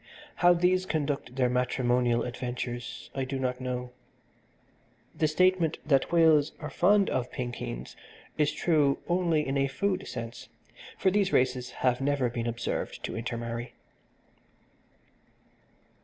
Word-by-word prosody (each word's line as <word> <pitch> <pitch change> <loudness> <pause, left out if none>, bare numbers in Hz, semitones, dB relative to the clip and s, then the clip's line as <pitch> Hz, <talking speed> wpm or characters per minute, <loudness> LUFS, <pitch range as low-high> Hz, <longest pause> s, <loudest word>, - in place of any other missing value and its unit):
How 175 0 +6
these 185 +2 +2
conduct 145 -6 -2
their 130 -2 +2
matrimonial 125 -1 +1
adventures 120 -1 -5
I 135 - -2
do 135 +1 -3
not 130 -1 -2
know 125 -1 -4 1.2
the 155 0 +1
statement 175 0 +2
that 140 -1 +2
whales 160 -3 +4
are - - -6
fond 200 +2 +4
of 125 -1 -1
pinkeens 65 - -5 0.4
is 150 -1 +2
true 150 -5 +2
only 170 -4 +1
in 135 +1 0
a 135 - +2
food 185 +8 -1
sense, 120 -1 -7 0.5
for 190 - +2
these 200 -1 +2
races 125 -1 +1 0.2
have 125 0 +2
never 135 -3 +1
been 120 0 -3
observed 120 0 -3
to - - -4
intermarry. 115 +1 -4
130 Hz, 125 wpm, -28 LUFS, 120-160 Hz, 1.2 s, How